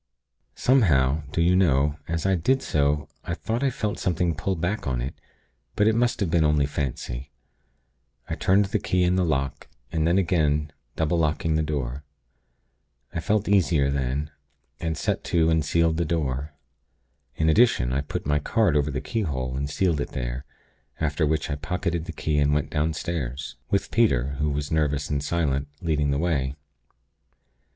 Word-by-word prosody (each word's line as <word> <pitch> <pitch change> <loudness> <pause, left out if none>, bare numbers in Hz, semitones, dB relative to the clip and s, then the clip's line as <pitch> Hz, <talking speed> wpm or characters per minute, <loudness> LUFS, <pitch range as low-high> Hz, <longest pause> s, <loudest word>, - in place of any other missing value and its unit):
Somehow, 80 - +3
do 85 - +1
you 90 +2 +4
know, 75 -5 +3
as 85 +1 -2
I 95 - +3
did 130 +10 +1
so, 75 0 +1 0.2
I - - -3
thought 115 +3 -2
I 140 - +3
felt 105 -4 -3
something 90 -2 +1
pull 95 +5 -2
back 90 +2 -2
on 65 -2 0
it; 65 +3 -3 0.6
but 105 - +3
it 110 - +4
must 120 +1 +1
have 90 -5 0
been 85 -1 +3
only 75 -2 +3
fancy. 70 -2 -4 1.0
I - - -3
turned 100 +2 +3
the 105 +2 -1
key 90 -1 +1
in 90 +1 +3
the 95 - +2
lock, 70 -5 -1 0.2
and 80 0 +1
then 85 +2 +3
again, 75 -5 +1 0.2
double 80 +2 +1
locking 80 0 +1
the 80 - +2
door. 70 -3 -3 1.1
I - - -2
felt 105 +5 0
easier 85 -8 +3
then, 70 +2 -2 0.5
and 80 -2 -2
set - - -1
to 80 -1 +2
and 80 -1 +2
sealed 80 +1 +2
the 85 - +1
door. 75 -2 -2 0.8
In 80 - +1
addition, 80 - +4
I 70 - +1
put 70 - -5
my 75 0 +2
card 95 +2 +2
over 75 0 +2
the 70 0 -3
keyhole, 70 - -2
and 70 +1 -2
sealed 80 0 +1
it - - -5
there; - - -4 0.5
after 75 0 +1
which 80 +1 0
I 70 - -2
pocketed 85 +1 -2
the - - -5
key, 75 -2 -1
and 75 0 +3
went 75 - -1
downstairs 75 -4 -2
with 100 - 0
Peter; 70 - +3
who 75 0 +1
was 70 0 -3
nervous 75 -2 0
and 70 -1 0
silent, 75 -3 0
leading 75 -4 0
the 70 - +1
way. 70 -5 0
75 Hz, 175 wpm, -25 LUFS, 70-85 Hz, 1.1 s, you